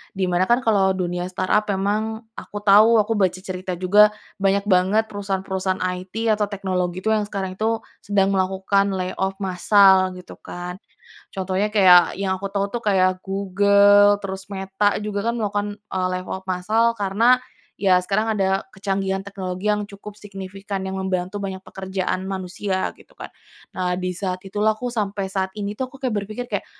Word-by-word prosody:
di 190 -1 0
mana 180 +1 +2
kan 240 +2 +3
kalau 195 -4 +3
dunia 180 -1 -2
startup 185 +3 0
emang 215 +3 -1 0.2
aku 205 - -8
tahu 215 +3 +6
aku 225 +2 -1
baca 185 -2 +3
cerita 185 -1 -5
juga 205 +4 +5 0.3
banyak 200 0 +2
banget 190 +4 +3
perusahaan-perusahaan 190 -2 -2
IT 185 +5 -2
atau 210 -1 +2
teknologi 185 -2 -2
itu 220 - 0
yang 215 -1 +1
sekarang 190 -2 -4
itu 225 +1 0 0.2
sedang 195 -1 +1
melakukan 195 +1 +1
lay 185 0 -2
off 190 0 0
massal 190 0 +4
gitu 180 - -11
kan. 180 0 -7 0.6
Contohnya 190 +1 -1
kayak 180 -4 +6
yang 190 -1 0
aku 195 - -7
tahu 200 0 0
tuh 240 +1 -3
kayak 185 -2 +2
Google 200 +1 +4
terus 190 0 -5
Meta 195 +1 0
juga 210 +2 -2
kan - - -5
melakukan, 205 -2 -1 0.2
eee, 185 -1 0
lay 185 - -2
off 190 0 -6
massal 215 +6 +1
karena 225 +6 +3 0.4
ya 190 -2 +4
sekarang 215 +4 0
ada 195 0 +1
kecanggihan 195 0 -2
teknologi 190 -1 -6
yang 210 0 +1
cukup 200 +1 -10
signifikan 195 -1 -6
yang 190 0 -4
membantu 185 +1 -2
banyak 190 -1 -4
pekerjaan 190 -1 -3
manusia 190 0 -3
gitu - - -20
kan. - - -8 0.5
Nah, 180 -1 -1
di 185 0 -2
saat 185 0 -3
itulah 210 +3 +1
aku 245 +2 -3
sampai 200 -3 -2
saat 190 -1 -1
ini 205 0 -3
tuh 260 -1 -3
aku 270 - -12
kayak 255 -4 -1
berpikir 215 +4 -6
kayak, - - -3
195 Hz, 170 wpm, -22 LUFS, 185-205 Hz, 0.6 s, tahu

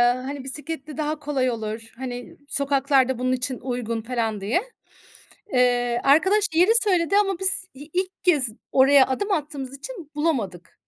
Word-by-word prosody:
hani, 265 +2 -6
bisikletle 295 +2 -3
daha 305 0 -2
kolay 285 -3 -1
olur. 220 0 -6
Hani, 245 -1 -7
sokaklar 275 -2 +2
da 260 -2 -2
bunun 255 0 0
için 255 0 -2
uygun 240 -3 -4
felan 225 -3 -3
diye. 225 - 0 0.9
Eee, 245 -1 +1
arkadaş 380 +10 +4
yeri 355 +6 +4
söyledi 370 -2 +1
ama 390 -3 +1
biz 380 -1 +3
i 275 - -10
ilk 370 +1 -3
kez 300 -10 +6 0.2
oraya 270 0 +5
adım 405 +11 -2
attığımız 285 -6 -3
için 345 - -9
bulamadık. 220 - -3
275 Hz, 150 wpm, -23 LUFS, 245-320 Hz, 0.9 s, kez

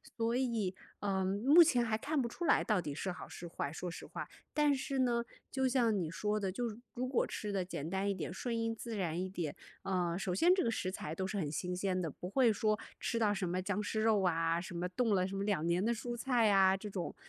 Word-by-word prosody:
所 230 0 0
以， 230 -7 0 0.3
嗯， 190 -2 0 0.2
目 300 +7 +8
前 255 -7 +5
还 220 -2 0
看 290 +4 0
不 235 - -2
出 345 - -4
来 - - +4
到 210 -5 +2
底 145 -4 -5
是 185 +4 -2
好 - - -8
是 175 - -8
坏， 140 - -3
说 180 +1 -4
实 - - -8
话。 - - -6 0.3
但 295 -1 +4
是 270 0 -2
呢， 240 -2 +2 0.3
就 265 -1 +1
像 235 -5 +2
你 160 -3 -2
说 210 +4 -1
的， 195 -2 -1
就 225 +2 -3 0.2
如 255 +1 -2
果 255 -1 +2
吃 210 - -4
得 190 -2 -1
简 160 -3 -5
单 190 +2 -1
一 - - +2
点、 180 -3 -4
顺 235 +6 -3
应 225 0 -1
自 230 0 -6
然 175 -4 -1
一 185 - -1
点， 170 -6 -3 0.3
嗯， 180 -3 0
首 180 -2 -1
先 350 - +5
这 375 - +2
个 230 - +1
食 190 -4 -1
材 160 -4 -5
都 190 - -2
是 195 +2 -3
很 155 -6 -1
新 180 +3 -2
鲜 185 0 0
的， 165 -3 -1
不 180 - -7
会 240 +1 +4
说 215 +1 +1 0.2
吃 235 - -1
到 215 -3 +3
什 190 -3 -2
么 180 +1 0
僵 205 +2 -1
尸 215 +1 -1
肉 215 -2 +4
啊， 165 -1 +2
什 180 -1 -7
么 175 +1 -1
冻 225 +1 +1
了 185 -1 +2
什 195 - -5
么 195 - -1
2 200 -6 0
年 170 +2 +2
的 230 - +2
蔬 240 +1 -4
菜 240 -1 +2
呀 195 -2 +5
这 210 +2 -7
种。 185 -3 -4
200 Hz, 275 characters per minute, -34 LUFS, 180-235 Hz, 0.3 s, 目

